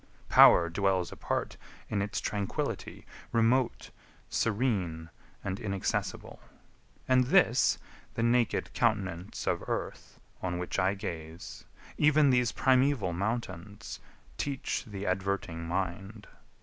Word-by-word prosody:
Power 85 - +8
dwells 95 0 0
apart - - -3 0.3
in 100 -2 -1
its 105 +1 -2
tranquillity, 100 -2 -3 0.3
Remote, 115 +2 +1 0.4
serene, 95 -9 -1 0.3
and 95 0 -3
inaccessible: 100 -4 -3 0.7
And 130 -1 +4
this, - - +4 0.4
the 115 - 0
naked 120 -1 +1
countenance 95 -6 -1
of - - 0
earth, - - -5 0.2
On 90 -1 -2
which 90 +2 -3
I 95 +2 +2
gaze, 80 -3 -7 0.3
even 150 -2 +5
these 125 -2 +3
primeval 130 -7 +2
mountains 100 +1 -4 0.4
Teach 135 -2 -2
the 100 -3 -6
adverting 95 -3 -2
mind. 95 +4 -3
100 Hz, 105 wpm, -30 LUFS, 90-120 Hz, 0.7 s, Power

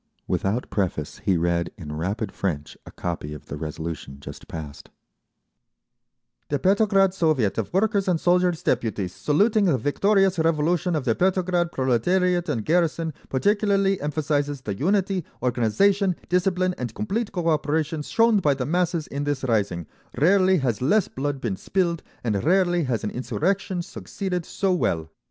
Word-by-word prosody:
Without 105 +6 -1
preface 90 -7 -2
he 95 - +3
read 85 0 0
in 75 -5 -7
rapid 95 +6 -2
French 75 -7 -3
a - - -9
copy 80 -3 -4
of 75 - -12
the - - -6
resolution 75 -2 -6
just 70 - -10
passed: 75 -3 -8 1.6
The 145 - +1
Petrograd 195 +3 +3
Soviet 155 - +1
of 110 - -3
Workers' 200 +1 +1
and 175 -3 +2
Soldiers' 180 -1 +2
Deputies, 110 -7 -1
saluting 205 +8 +2
the 160 -8 +3
victorious 195 - +2
Revolution 165 +2 +1
of 145 -4 -2
the 115 - +3
Petrograd 180 +1 +1
proletariat 175 +8 +1
and 115 -7 -2
garrison, 165 -1 +1 0.2
particularly 200 +5 +2
emphasises 145 -1 -1
the 105 -6 -3
unity, 190 - 0 0.2
organisation, 180 - +2
discipline, 180 0 +1
and 125 -1 -4
complete 215 +2 -2
cooperation 160 -3 0
shown 225 +7 +3
by 145 -6 +2
the 130 - -3
masses 170 +1 0
in 140 +1 -4
this 145 -2 -2
rising; 100 -9 0 0.3
rarely 185 +5 +4
has 125 -8 -1
less 200 +10 +3
blood 140 +1 -3
been 115 -7 -2
spilled, 170 - -1 0.2
and 105 -5 -1
rarely 175 -1 +3
has 120 -5 -1
an 105 - -2
insurrection 180 +7 -1
succeeded 180 -1 -5
so 195 -2 0
well. 80 - -1
155 Hz, 145 wpm, -24 LUFS, 115-185 Hz, 1.6 s, rarely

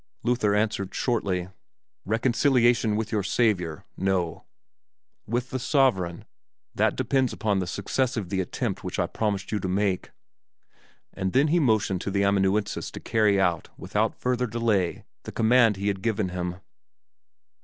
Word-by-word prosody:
Luther 120 -4 +2
answered 105 -2 -1
shortly, 95 -7 -1 0.6
"Reconciliation 120 0 +2
with 110 +1 -2
your 105 -2 +1
Savior 95 -6 0
no! 95 -4 -1 0.8
With 120 +3 -2
the 130 - -2
sovereign 120 - +1 0.5
that - - +1
depends 130 -3 +1
upon 105 -3 0
the 90 - -2
success 120 +8 -1
of 100 -6 -3
the 95 0 0
attempt 90 - -3
which - - -4
I - - +2
promised 100 -3 -2
you 105 - 0
to 95 - -3
make." 95 0 0 1.0
And 95 -1 -3
then 140 +3 +4
he 175 +3 +3
motioned 110 - +1
to - - -3
the 100 0 +1
amanuensis 100 +1 +1
to - - -8
carry 105 -3 +2
out, 90 -4 +1
without - - -1
further 125 0 -1
delay, 110 -5 0 0.2
the - - -8
command 115 -1 +4
he 100 +1 -2
had 95 -2 -3
given 110 -4 0
him. 90 -1 -3
105 Hz, 150 wpm, -26 LUFS, 95-120 Hz, 1.0 s, then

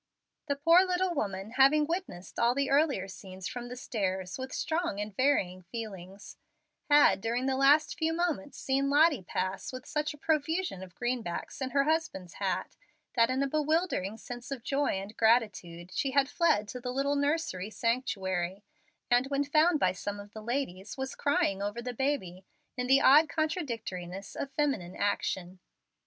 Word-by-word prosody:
The 285 - 0
poor 330 +6 +6
little 365 -1 0
woman, 200 - -3
having 290 +3 +6
witnessed 330 - -5
all 235 +1 +3
the 280 0 0
earlier 275 -9 +2
scenes 190 -1 -8
from 245 -1 -6
the 250 - -7
stairs 190 -5 -3
with 260 0 -5
strong 320 - -1
and 210 -1 -5
varying 190 -9 +1
feelings, 195 -1 -8 0.5
had, 290 -8 +6
during 235 +4 -1
the 265 0 +1
last 285 +3 +4
few 320 0 +1
moments, 325 -4 -2
seen 275 +1 0
Lottie 295 - +4
pass 185 +2 -3
with 255 0 -8
such 300 0 -2
a - - -17
profusion 315 - -1
of 185 -2 -11
greenbacks 240 -3 -3
in 260 - -1
her 275 +1 +2
husband's 295 - -1
hat - - -2 0.4
that 230 -1 +4
in 260 +2 +1
a - - +1
bewildering 305 - 0
sense 245 +2 -8
of 270 -4 -5
joy 280 +2 0
and 200 +3 -8
gratitude 185 -7 +1
she 270 - 0
had 270 0 +3
fled 295 -10 +2
to 250 - -6
the 250 0 -3
little 275 +2 0
nursery 285 - -1
sanctuary, 195 -6 -1 0.5
and 245 +2 +4
when 280 0 0
found 305 +3 +3
by 185 - +3
some 205 +2 -5
of 205 0 -11
the 220 - -8
ladies 220 -5 -3
was 265 0 -3
crying 200 -9 +1
over 205 +3 -3
the 245 +1 -4
baby 235 -9 -2 0.3
in 250 0 -2
the 270 +1 +6
odd 295 +3 +7
contradictoriness 225 - -3
of 280 - -4
feminine 270 - -1
action. 190 -2 -2
250 Hz, 170 wpm, -30 LUFS, 195-290 Hz, 0.5 s, odd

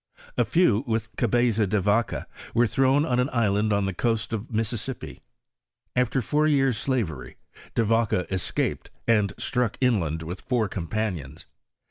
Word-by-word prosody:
A - - +3
few 135 - +3
with 110 -1 -2
Gabeza 120 -2 +2
de 105 - +2
Yaca 105 +4 +1 0.3
were 120 - +5
thrown 135 +5 +3
on 125 -3 +1
an 125 +3 +1
island 105 -2 +1
on 100 -1 +2
the 95 - -2
coast 115 +3 -1
of 110 +2 -4
Mississippi. 115 +3 -3 0.7
After 125 +1 +1
four 150 +1 +2
jears' 135 -5 +2
slavery, 90 - -2 0.4
De 115 - +3
'^aca 110 -4 +1
escaped 95 -2 -2 0.2
and 105 -4 +2
stmck 125 -4 -1
inland 90 - +1
with 90 +3 -7
fonr 120 -4 +2
companions. 90 -6 -3
110 Hz, 145 wpm, -25 LUFS, 100-125 Hz, 0.7 s, were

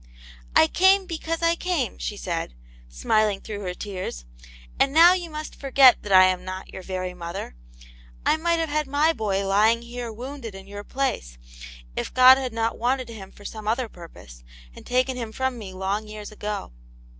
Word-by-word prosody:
"I - - +7
came 380 - +4
because 330 -1 -4
I 335 0 +3
came," 340 -9 -2
she 210 - -4
said^ 170 - -4 0.4
smiling 195 - +1
through 205 0 -7
her 180 -3 -5
tears. 185 - -6 0.5
"And 275 - +3
now 335 +3 +8
you 355 -2 -3
must 305 0 -7
forget 270 -2 +5
that 205 - -7
I 185 -1 +8
am 185 -1 0
not 185 0 -7
your 190 - -7
very 185 -1 -4
mother; 170 - -7 0.7
I - - +4
might 335 +1 +1
have 325 -1 -1
had 300 0 -1
my 295 +4 +2
boy 200 -6 -1
lying 215 +4 +3
here 240 0 -6
wounded 240 -1 -8
in 195 0 -10
your 205 +1 -8
place, 135 - -3 0.6
if - - -3
God 255 +1 +8
had 260 -2 -3
not 225 0 -2
wanted 250 +1 0
him 205 -4 -10
for 205 - -16
some 215 0 -7
other 235 +3 0
purpose, 165 - -14 0.3
and - - -13
taken 255 +1 +1
him 230 -3 -5
from 260 +1 -2
me 200 -3 -8
long 195 +3 -3
years 210 0 -8
ago." 210 - -5
225 Hz, 185 wpm, -24 LUFS, 195-270 Hz, 0.7 s, now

